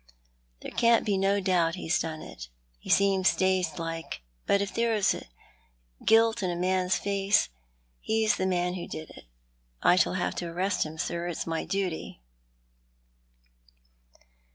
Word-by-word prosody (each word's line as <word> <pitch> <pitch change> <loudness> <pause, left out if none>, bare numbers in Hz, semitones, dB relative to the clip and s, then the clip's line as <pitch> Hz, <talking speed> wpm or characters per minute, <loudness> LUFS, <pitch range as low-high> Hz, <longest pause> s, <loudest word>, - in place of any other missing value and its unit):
There - - -6
can't 235 -1 +3
be 205 -3 +1
no 195 +1 +2
doubt 180 -3 +1
he's 180 -1 0
done 160 -1 -4
it. - - -9 0.3
He - - -12
seems 195 -1 +4
dazed 185 -3 +1
like, 165 - -5 0.2
but 200 - +4
if 200 -1 -2
ever - - -16
there 235 -1 +2
was 205 -2 +2 0.9
guilt 225 +1 +4
in 185 - 0
a 175 - -2
man's 185 +1 +1
face, 200 0 +1 0.5
he's 220 -1 +1
the 190 - 0
man 180 -1 0
who 180 -2 -5
did 155 0 -7
it. - - -14 0.6
I - - +6
shall 185 - +2
have 185 - -1
to 175 - -3
arrest 180 +1 -1
him 155 +1 -10
sir. 170 +2 -3
It's 175 - -3
my 165 -1 -2
duty." 185 - -3
185 Hz, 155 wpm, -28 LUFS, 170-200 Hz, 0.9 s, I